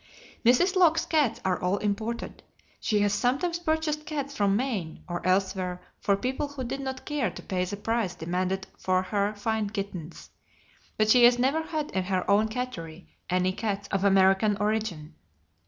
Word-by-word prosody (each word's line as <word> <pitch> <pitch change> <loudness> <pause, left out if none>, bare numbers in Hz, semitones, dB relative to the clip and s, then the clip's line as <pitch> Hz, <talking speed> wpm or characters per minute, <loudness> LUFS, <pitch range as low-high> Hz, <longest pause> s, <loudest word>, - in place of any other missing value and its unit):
Mrs. 255 +11 +4
Locke's 335 -3 +4
cats 295 -8 +1
are 185 -1 0
all 180 +3 +1
imported. 215 +3 -3 0.4
She 210 -1 +1
has 205 0 +2
sometimes 280 +10 0
purchased 315 -2 -1
cats 280 -2 -4
from 200 -1 +2
Maine 215 -9 -2
or 175 -1 -4
elsewhere 185 -1 0 0.2
for 200 - +2
people 260 +7 -2
who 285 -2 -6
did 265 +3 -4
not 265 -1 -5
care 295 -6 0
to - - -9
pay 185 -1 -1
the 200 +3 -5
price 220 -3 -1
demanded 185 +3 -2
for 185 0 +1
her 205 +2 -1
fine 215 0 -1
kittens, 195 -6 -6 0.7
but 215 0 +3
she 245 0 +6
has 240 0 +6
never 270 +6 +2
had 315 -2 -3
in 190 -1 -1
her 185 -1 -1
own 205 +2 +4
cattery 185 -8 -6 0.2
any 185 +1 +2
cats 200 -1 -3
of 195 -1 0
American 195 +1 +4
origin. 205 -7 -2
210 Hz, 170 wpm, -27 LUFS, 190-260 Hz, 0.7 s, she